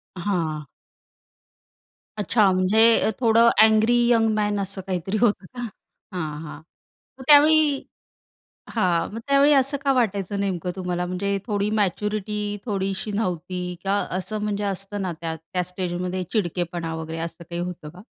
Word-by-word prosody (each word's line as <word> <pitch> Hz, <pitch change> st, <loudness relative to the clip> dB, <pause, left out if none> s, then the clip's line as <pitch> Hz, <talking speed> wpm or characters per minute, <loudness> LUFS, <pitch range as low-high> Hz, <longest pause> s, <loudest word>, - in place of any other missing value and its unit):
हां. 170 Hz, -5 st, -2 dB, 1.5 s
अच्छा, 210 Hz, -1 st, +3 dB
म्हणजे 215 Hz, +5 st, +5 dB
अ, -, -, +2 dB
थोडं 230 Hz, -1 st, +5 dB
अँग्री 220 Hz, +2 st, +4 dB, 0.2 s
यंग 225 Hz, -1 st, +4 dB
मॅन 210 Hz, -1 st, 0 dB
असं 195 Hz, 0 st, -4 dB
काहीतरी 190 Hz, +3 st, -2 dB
होतं 205 Hz, -5 st, +2 dB
का? 245 Hz, +6 st, -9 dB, 0.5 s
हां, 155 Hz, -4 st, -4 dB
हां, 150 Hz, -, -8 dB, 0.6 s
मग 260 Hz, -, -10 dB
त्यावेळी 300 Hz, -1 st, +6 dB, 0.9 s
हां, 180 Hz, -7 st, +1 dB
मग 225 Hz, -, -5 dB
त्यावेळी 280 Hz, +1 st, +5 dB
असं 275 Hz, +1 st, +2 dB
का 275 Hz, -1 st, +3 dB
वाटायचं 205 Hz, -5 st, 0 dB
नेमकं 185 Hz, -3 st, -2 dB
तुम्हाला 180 Hz, -1 st, -2 dB
म्हणजे 200 Hz, +2 st, -2 dB
थोडी 205 Hz, -1 st, 0 dB
मॅच्युरिटी 210 Hz, +1 st, -1 dB
थोडीशी 195 Hz, -1 st, -2 dB
नव्हती 180 Hz, -3 st, -3 dB, 0.2 s
का 195 Hz, +1 st, +1 dB, 0.2 s
असं 215 Hz, +3 st, -4 dB
म्हणजे 210 Hz, -1 st, -2 dB
असतं 195 Hz, +1 st, -4 dB
ना 185 Hz, -2 st, -2 dB
त्या 165 Hz, -1 st, -3 dB
त्या 170 Hz, +3 st, -4 dB
स्टेजमध्ये 180 Hz, 0 st, -3 dB
चिडकेपणा 175 Hz, -4 st, -2 dB
वगैरे 160 Hz, 0 st, -5 dB
असं 165 Hz, +1 st, -6 dB
काही 170 Hz, 0 st, -3 dB
होतं 175 Hz, -4 st, -6 dB
का? 180 Hz, +3 st, -13 dB
195 Hz, 140 wpm, -23 LUFS, 180-215 Hz, 1.5 s, त्यावेळी